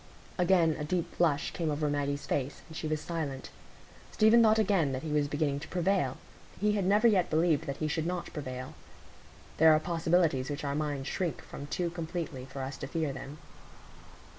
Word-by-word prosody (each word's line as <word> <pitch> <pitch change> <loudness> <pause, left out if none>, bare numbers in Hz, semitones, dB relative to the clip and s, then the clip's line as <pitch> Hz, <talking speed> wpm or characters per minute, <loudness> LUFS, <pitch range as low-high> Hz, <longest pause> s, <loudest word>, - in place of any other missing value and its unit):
Again 175 -3 +4
a - - -2
deep 170 +3 -2
flush 155 -4 +1
came 165 -3 -2
over 150 0 0
Maggie's 145 0 -1
face, 135 0 -2
and 160 - -12
she 155 - -3
was 155 0 -1
silent. 150 -5 -4 0.6
Stephen 220 +2 +5
thought 220 -1 +5
again 190 -10 +2
that 130 - -4
he 155 - -4
was 150 -1 +2
beginning 145 -1 -1
to 160 - -9
prevail,—he 185 +3 -1
had 205 -3 0
never 210 +4 +4
yet 190 -6 +3
believed 160 -1 +2
that 140 0 -3
he 155 - -1
should 160 +1 -1
not 180 -1 -4
prevail; 130 -2 -6 0.8
there 160 0 +7
are 155 - +4
possibilities 165 -4 +1
which 145 0 -4
our 140 -1 -1
minds 145 -2 -2
shrink 170 -8 -2
from 140 - -8
too 175 +2 -2
completely 160 -6 -5
for 135 0 -6
us 135 +1 -5
to 135 - -6
fear 155 -1 -2
them. 140 +3 -8
155 Hz, 190 wpm, -30 LUFS, 140-175 Hz, 0.8 s, there